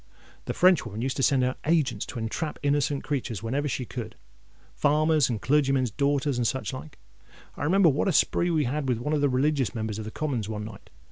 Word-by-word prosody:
The - - -3
Frenchwoman 120 - +3
used 130 0 -1
to - - 0
send 135 -1 +3
out 125 +1 -1
agents 160 -3 +1
to - - -7
entrap 120 +8 -3
innocent 145 -1 +1
creatures 120 -7 -3
wherever 140 +6 -1
she 125 -1 -3
could—farmers' 135 - -1
and 115 -3 -2
clergymen's 135 -2 +2
daughters, 140 +1 0
and 120 - +2
such 130 0 -2
like. 140 +3 -9 0.6
I - - -5
remember 185 +4 +4
what 145 +7 0
a - - +3
spree 175 +2 +2
we 160 -3 +2
had 135 +1 -2
with 125 - +1
one 150 +7 -2
of 150 - +1
the 145 - +3
religious 135 0 +1
Members 110 -1 -3
of 110 - -5
the - - -5
Commons 125 -5 -3
one 105 -1 -4
night. 105 -2 -11
135 Hz, 205 wpm, -26 LUFS, 120-150 Hz, 0.6 s, remember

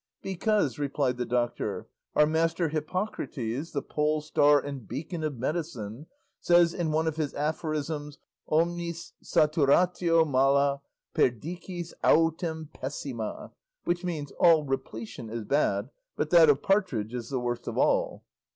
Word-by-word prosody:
"Because," 190 - 0
replied 140 -3 0
the 125 - -2
doctor, 120 0 -1 0.3
"our 150 - +6
master 165 +1 +1
Hippocrates, 155 - -3
the 140 -3 -2
polestar 150 -1 +2
and 135 -5 -7
beacon 160 - -5
of 150 -4 -2
medicine, 130 -3 -4 0.3
says 175 -1 +4
in 170 -3 -1
one 155 +1 +1
of 160 -1 -2
his 150 -3 -2
aphorisms 150 -1 -3 0.3
omnis 170 +1 -1
saturatio 165 +3 +3
mala, 140 0 +2 0.3
perdicis 170 - -2
autem 160 -1 +2
pessima, 130 -4 -5 0.3
which 175 +1 -1
means 155 -5 -4
'all 165 -3 +6
repletion 115 -4 -5
is 115 0 -4
bad, 115 -3 0 0.2
but 150 - -2
that 165 -3 +7
of 145 -1 +3
partridge 145 - +1
is 120 -2 -5
the 135 -2 -1
worst 120 0 -3
of - - -4
all." - - +1
150 Hz, 130 wpm, -28 LUFS, 135-165 Hz, 0.3 s, that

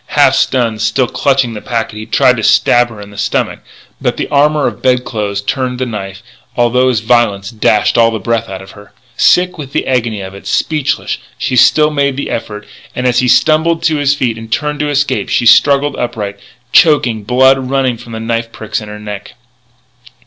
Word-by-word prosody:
Half - - +5
stunned, 115 -4 0
still 115 +4 +1
clutching 130 -1 0
the 105 - -7
packet, 115 -3 -3
he 110 0 -8
tried - - +3
to - - -4
stab 120 0 +3
her 110 -2 -12
in 100 0 -11
the 100 - -10
stomach; - - -1 0.4
but - - -1
the - - -3
armour 150 0 +2
of - - -3
bed 125 -1 +1
clothes 100 -3 -3
turned 125 +3 -2
the 130 - -2
knife, 100 -4 -7 0.3
although 125 +2 +2
his 115 -5 0
violence 110 -4 +1
dashed 110 0 +1
all 115 -1 +3
breath 115 0 -2
out 95 0 -7
of 95 - -13
her. 100 0 -16 0.2
Sick 180 -2 +2
with 140 -2 -8
the - - -1
agony 120 -5 -1
of 95 0 -8
it, 100 0 -11
speechless, 150 +6 -1 0.2
she 130 - -2
still 150 +5 +4
made 140 -2 0
the 140 - -4
effort; 105 -2 -5 0.3
and, 125 - -3
as 125 -1 +2
he 125 - +1
stumbled 160 +5 +2
to 160 -2 +1
his 145 -1 +1
feet 120 -5 -2
and 115 0 -11
turned 150 +2 -2
to 150 0 -1
escape, 140 -8 -1
she - - 0
struggled 140 +4 +4
upright, 105 -5 -4 0.3
choking, 130 -9 +4
blood 130 +3 +3
running 135 -2 0
from 115 0 -12
the 110 - -5
knife 115 0 -3
pricks 110 -1 -5
in 105 - -9
her 105 - -8
neck. 105 -1 -8
120 Hz, 200 wpm, -13 LUFS, 110-135 Hz, 0.4 s, Half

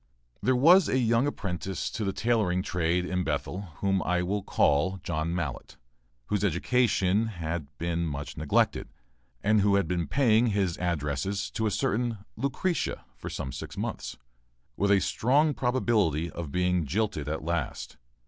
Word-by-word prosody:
There 130 - +2
was 165 +8 +6
a 130 - +2
young 120 +1 +2
apprentice 95 - -3
to 110 - -3
the 100 - 0
tailoring 100 -5 +1
trade 90 -2 0
in 90 0 -1
Bethel, 95 +2 -3
whom 95 -1 +2
I 90 0 0
will 100 +3 -1
call 95 +2 +2
John 85 0 -2
Mallett, 80 -7 -4 0.5
whose 105 +6 -1
education 105 0 +2
had 85 -6 -4
been 85 0 -1
much 75 -1 -5
neglected, 75 -1 +1 0.5
and 105 0 +4
who 100 0 +3
had 100 -4 +2
been 85 -1 -1
paying 120 -4 +3
his 100 -6 0
addresses 90 +4 -2
to 110 - -1
a - - +2
certain 120 -1 0 0.2
"Lucretia" 140 +8 -1
for - - -7
some 65 - -4
six - - -7
months, - - -4 0.6
with 100 +2 +1
a 100 -1 +5
strong 145 +6 +2
probability 110 - +1
of 80 -4 -6
being 90 -2 +1
jilted 90 -5 -1
at 80 - -3
last. 85 -1 -3
95 Hz, 155 wpm, -28 LUFS, 85-110 Hz, 0.6 s, was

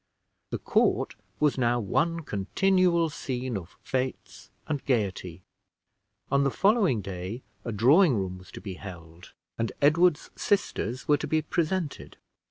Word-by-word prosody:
The - - -2
court - - +1 0.3
was 150 -3 +2
now 120 -1 +2
one 165 - 0
continual 170 - +2
scene 130 -3 -4
of 95 -2 -7
fetes 130 -1 -4 0.2
and 145 -3 -2
gayety. 95 -8 -1 0.9
On 140 0 +4
the 140 - +3
following 195 - +3
day 95 +5 -6 0.2
a 115 - -3
drawing 135 - +5
room 95 -2 -3
was 90 - -15
to - - -8
be 100 -3 -6
held, 85 -3 -11 0.3
and 115 - 0
Edward's 155 +2 +3
sisters 130 - -1
were 150 - +5
to - - -4
be 155 -1 +1
presented. 170 0 -2
130 Hz, 140 wpm, -27 LUFS, 100-160 Hz, 0.9 s, drawing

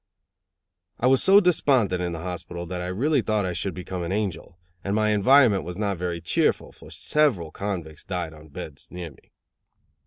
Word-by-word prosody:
I - - 0
was 130 0 +5
so 195 +1 +7
despondent 130 - +2
in 90 -1 -2
the 80 - -5
hospital 90 -1 -6
that 90 +1 -5
I 90 - -4
really 130 +10 +1
thought 110 -3 0
I 90 - -2
should 95 0 -3
soon 90 - -6
become 90 0 -5
an 85 +1 -3
angel; 95 -4 -3 0.3
and 100 +1 -1
my 110 0 +2
environment 105 0 +5
was 90 +1 -7
not 100 -4 -2
very 90 -1 -2
cheerful, 85 - 0
for - - -15
several 120 - +1
convicts 85 -7 -5
died 90 -4 -4
on 80 0 -14
beds 70 0 -8
near 90 -3 -7
me. - - -23
90 Hz, 190 wpm, -25 LUFS, 85-110 Hz, 0.3 s, so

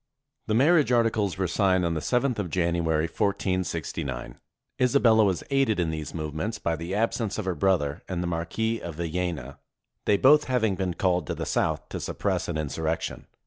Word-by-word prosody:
The 110 - +1
marriage 150 +2 +4
articles 110 -5 +2
were 95 - 0
signed 95 0 +2
on 85 - 0
the 80 - -2
7 125 - +1
th 110 - -7
of 90 - -7
Jan 85 0 +1
uary, 80 -2 +1
1469. 95 - -2 0.4
Isabella 120 -4 +5
was 95 -4 +1
aided 135 -7 +2
in 85 -2 0
these 80 -1 -5
movements 80 +8 -3
by 85 -5 -1
the 85 +4 -4
absence 110 -1 0
of 110 - -3
her 95 - 0
brother 75 -4 +1
and 90 -2 -2
the - - -2
Marquis 90 +7 -1
of 85 -3 -6
Villena, 85 -5 -3 0.5
they 105 - +4
both 150 +5 +6
having 115 -5 +1
been 95 -2 -2
called 90 -5 +1
to - - -2
the - - -4
south - - 0
to - - -5
suppress - - -2
an 85 - -2
insurrection. 80 +2 -3
95 Hz, 185 wpm, -26 LUFS, 85-110 Hz, 0.5 s, both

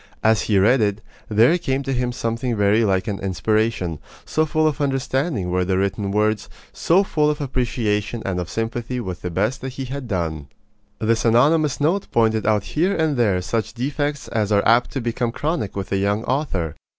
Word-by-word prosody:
As 110 -3 +4
he 105 - +1
read 110 +6 +4
it, 100 -1 +1 0.3
there 115 +9 +5
came 135 -4 -1
to 135 0 -2
him 125 -1 -1
something 115 0 -2
very 105 +2 +3
like 95 -3 +1
an 100 -2 -2
inspiration, 100 -3 0 0.3
so 155 0 0
full 155 0 +1
of 150 -2 -1
understanding 135 - -1
were 90 0 +1
the 95 +1 0
written 100 +1 -1
words, 105 +1 0 0.2
so 185 +4 +3
full 150 -5 +1
of 150 0 -1
appreciation 115 -5 -1
and 95 -2 -1
of 90 - -4
sympathy 115 +2 -3
with 95 -6 -5
the 90 - -3
best 105 +9 -1
that 130 0 -5
he 135 0 -5
had 130 0 -6
done. 80 -8 -3 0.5
This 110 0 +1
anonymous 145 +6 +3
note 170 +7 0
pointed 110 -2 +2
out 105 -2 +2
here 175 - 0
and 160 -3 +1
there 100 -7 +1
such 115 +3 -2
defects 145 +3 -2
as 110 -2 -1
are 100 -1 +3
apt 120 +2 +4
to 135 - -2
become 120 0 -1
chronic 150 - -2
with 100 -1 -5
a 100 - +2
young 100 +3 0
author. 100 - -1
115 Hz, 195 wpm, -21 LUFS, 100-135 Hz, 0.5 s, there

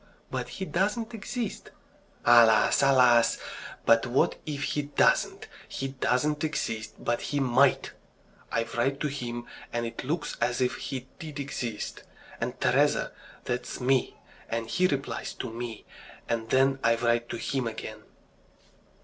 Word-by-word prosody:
"But - - -3
he 190 - -5
doesn't 210 +6 -1
exist." 225 +1 -4 0.6
"Alas! 115 -2 +6
alas! 125 -4 +5 0.5
But 115 +1 +5
what 125 +2 +2
if 145 -2 -3
he 145 - 0
doesn't? 145 0 +2 0.2
He 135 - -4
doesn't 140 +3 0
exist, 115 -8 -2
but 120 0 -1
he 145 - -1
might! 135 +1 +3 0.6
I 115 - +1
write 135 +4 +1
to 150 - +1
him, 120 -3 -5 0.3
and 120 0 -1
it 115 - -5
looks 150 +3 -2
as 125 0 +1
if 125 -1 +2
he 130 -2 -5
did 155 -4 -7
exist. 120 -6 -4 0.4
And - - -3
Teresa - - +2 0.3
that's 125 0 -3
me, 130 0 +1 0.3
and 115 0 -2
he 185 0 +3
replies 140 -3 -3
to 120 -3 -5
me, 115 -2 -6 0.4
and 115 -1 -2
then 135 +1 +3
I 115 0 +4
write 120 0 +1
to - - -3
him 130 0 -1
again..." 110 -1 -6
125 Hz, 140 wpm, -28 LUFS, 120-145 Hz, 0.6 s, Alas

